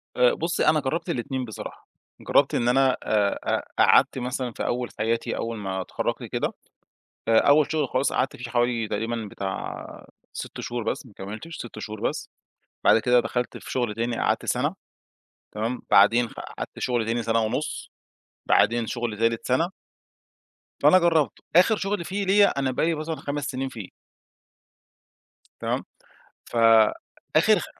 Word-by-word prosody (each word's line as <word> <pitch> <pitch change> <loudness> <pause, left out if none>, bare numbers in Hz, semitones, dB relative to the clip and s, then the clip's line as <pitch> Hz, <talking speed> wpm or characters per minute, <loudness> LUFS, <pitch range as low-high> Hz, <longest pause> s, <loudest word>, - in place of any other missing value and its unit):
آآ، 125 -1 +4
بُصّي 165 +1 -1
أنا 155 0 +5
جربت 150 +6 -3
الاتنين 130 -3 -2
بصراحة 110 -4 -9 0.3
جربت - - +3
إن 120 - +1
أنا 130 +1 +3
آآ، 105 -2 +1 0.4
أ - - +6
قعدت - - +5
مثلًا 125 0 -3
في - - -5
أول 125 0 -1
حياتي، 115 +2 0
أول 115 0 -3
ما 95 -2 -3
اتخرجت - - -3
كده - - -2 0.7
فأول 145 +7 +4
شغل 150 -4 0
خلاص 130 +2 0
قعدت 130 +1 0
فيه 120 -1 -7
حوالي 120 -2 +1
تقريبًا 115 +1 -3
بتاع 95 +1 -6 0.3
6 - - -7
شهور 120 0 -4
بس، 135 +3 -3
ما 110 - -16
كملتش، 110 +12 -7
6 120 -2 -8
شهور 110 0 -7
بس، - - -3 0.5
بعد - - +6
كده 125 +2 +4
دخلت 125 0 -3
في - - -11
شغل 120 -4 -1
تاني، 115 +1 -2
قعدت - - 0
سنة - - 0 0.8
تمام، 115 +4 -3
بعدين 115 +4 +5
قعدت - - -8
شغل 120 -3 0
تاني 115 +1 0
سنة 115 0 +1
ونُص. 125 +8 -3 0.6
بعدين 115 +2 +3
شغل 120 -2 -3
تالت 115 0 0
سنة 160 +8 +1 1.1
فأنا 185 - +7
جرّبت، 165 -4 +2 0.2
آخر 185 +5 +6
شغل 195 -3 -2
فيه 200 +3 -2
ليا، 200 -6 +4
أنا 135 -1 0
بقى 130 - 0
لي 165 0 +1
مثلًا 155 +1 -4
5 145 -1 -4
سنين 135 -1 -3
فيه. 110 -7 -8 1.7
تمام، - - -2 0.6
فآخر 115 -2 +3
خ - - -5
120 Hz, 155 wpm, -25 LUFS, 115-145 Hz, 1.7 s, فأنا